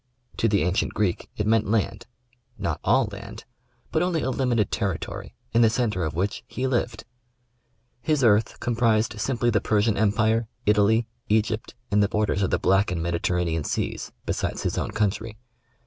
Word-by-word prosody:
To 115 - +2
the 100 -5 +2
ancient 90 +4 0
Greek 100 -5 -1
it 105 - 0
meant 110 -1 +2
land 110 -2 -1 0.3
— 120 0 -38
not - - -2
all - - +4
land, - - -9 0.5
but 160 - +1
only 175 -3 0
a 130 - 0
limited 120 -5 +1
territory, 95 -6 -3 0.2
in 115 - +4
the 115 - +6
centre 110 -6 0
of 80 -1 -3
which 95 +4 -2
he 130 - -3
lived. 120 -3 -1 1.0
His 150 +1 +1
earth 110 -1 +3
comprised 115 -2 +1
simply 120 0 +1
the 105 -2 +2
Persian 105 +1 +2
Empire, 110 +2 +2 0.2
Italy, 105 +2 +3 0.2
Egypt 110 +2 0 0.2
and 105 0 +4
the 100 - +2
bor 105 0 +1
ders 100 -1 -1
of 95 - +1
the - - +2
Black 95 +2 +3
and 85 -2 -2
Mediterranean 85 -1 0
seas, - - -3
besides - - -2
his - - -1
own - - -2
coun 105 -1 +1
try. 110 +1 -8
110 Hz, 180 wpm, -25 LUFS, 100-115 Hz, 1.0 s, the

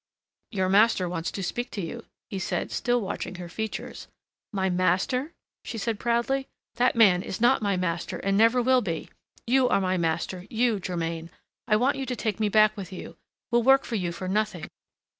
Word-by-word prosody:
"Your 190 -4 0
master 195 -1 +4
wants 170 -1 -3
to 195 - -5
speak 240 +7 -3
to - - -6
you," 165 - -6 0.3
he 195 - -3
said, - - -2
still 245 0 +1
watching 190 -1 -4
her 175 -1 -7
features. 220 +5 -5 0.4
"My 190 -3 0
master?" 185 - +1 0.3
she 230 - -6
said 220 0 -2
proudly; 240 +3 0 0.3
"that 245 +1 +3
man 195 -6 +5
is 185 - -5
not 240 +2 +4
my 200 -3 +1
master 170 -1 -2
and 195 0 0
never 230 +4 +4
will 255 +1 +4
be! 165 -6 -4 0.3
You 255 +1 +3
are - - +3
my 185 -1 0
master, 175 +2 -2
you, 230 -2 +1
Germain. 165 -2 -3 0.4
I 215 - +4
want 255 +6 +2
you 270 -1 -4
to 250 - -2
take 220 -3 -2
me 215 -1 +2
back 215 0 +5
with 195 -3 -7
you 185 - -8 0.4
will 240 0 +4
work 270 +3 +5
for - - -6
you 180 -6 -1
for 185 +2 -6
nothing!" 210 -3 -1
205 Hz, 195 wpm, -26 LUFS, 185-235 Hz, 0.4 s, man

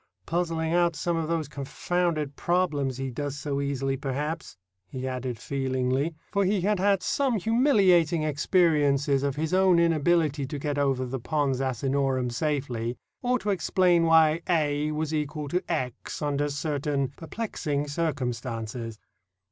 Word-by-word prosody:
"Puzzling 165 0 -1
out 175 -1 +3
some 170 +3 -1
of 165 -1 -1
those 165 -3 -1
confounded 150 +1 -2
problems 150 -7 0
he 135 -1 -3
does 145 +2 -4
so 140 -1 -2
easily, 135 -1 -1
perhaps," 145 - -4 0.3
he 130 +3 -5
added 125 -2 -3
feelingly, 130 +4 -1 0.2
for 200 -1 +2
he 195 0 +1
had 205 +1 +1
had 195 0 +2
some 270 -5 +1
humiliating 190 - +3
experiences 145 -3 +2
of 140 -1 -1
his 155 +3 -2
own 185 -1 +5
inability 160 -3 +2
to 145 - -5
get 145 0 -2
over 135 -2 +1
the 130 +1 -4
Pons 140 0 0
Asinorum 130 0 0
safely, 125 -4 -2 0.2
or 250 0 +2
to 210 -4 -2
explain 175 -1 +3
why 160 0 +5
a 150 -3 +1
was 155 0 -2
equal 150 0 -2
to 180 +5 0
x 130 -7 -3
under 145 0 0
certain 145 -2 -1
perplexing 155 -5 -3
circumstances. 120 -7 -3
150 Hz, 140 wpm, -27 LUFS, 135-170 Hz, 0.3 s, own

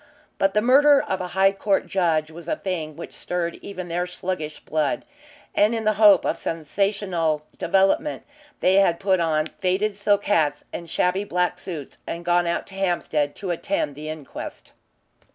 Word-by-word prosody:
But 195 +1 +2
the 210 - +3
murder 280 +3 +6
of 190 - -2
a 180 - -3
High 195 0 +6
Court 195 0 0
judge 160 -4 +1
was 165 +1 -11
a - - 0
thing 160 -5 -4
which 165 - -8
stirred 175 -1 -3
even 185 -3 -7
their 175 +1 -1
sluggish 180 -4 -4
blood, 155 -2 -1 0.5
and 210 +3 +3
in 225 - -2
the 215 0 +3
hope 205 -4 +7
of - - -1
some 165 -1 -3
sensational 175 -5 0
development 195 - +2 0.4
they 185 +1 +4
had 175 -4 +4
put 190 -2 +2
on 155 -2 +1
faded 190 +5 -1
silk 205 0 +2
hats 150 -7 +1
and 170 -1 -6
shabby 180 +4 +1
black 180 -2 -1
suits 155 -7 -7
and 170 +1 -5
gone 175 0 +3
out 170 - -1
to - - -14
Hampstead 175 -6 0
to 190 -3 -4
attend 170 -4 -1
the 150 +2 -7
inquest. 155 -3 -8
180 Hz, 175 wpm, -24 LUFS, 165-195 Hz, 0.5 s, hope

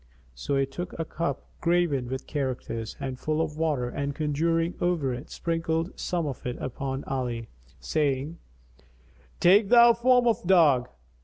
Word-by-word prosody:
So - - -3
he 135 - +2
took 175 +6 -7
a 165 - -2
cup 155 -4 -3 0.2
graven 170 -7 +1
with 130 +2 -5
characters 130 -5 -4
and 130 -2 -5
full 155 +2 -1
of 160 -2 -1
water 155 -6 0
and 140 +2 -3
conjuring 165 +3 0
over 165 -7 +1
it, 125 +4 -7
sprinkled 165 +1 -2
some 175 -3 -1
of 135 -4 -5
it 125 -1 -4
upon 135 +1 -4
Ali, 120 -4 -3 0.3
saying, 150 +1 -1 1.0
"Take 195 +3 +5
thou 235 -1 +8
form 245 +1 +3
of 230 -3 +1
dog." 150 -10 +4
150 Hz, 150 wpm, -27 LUFS, 130-170 Hz, 1.0 s, thou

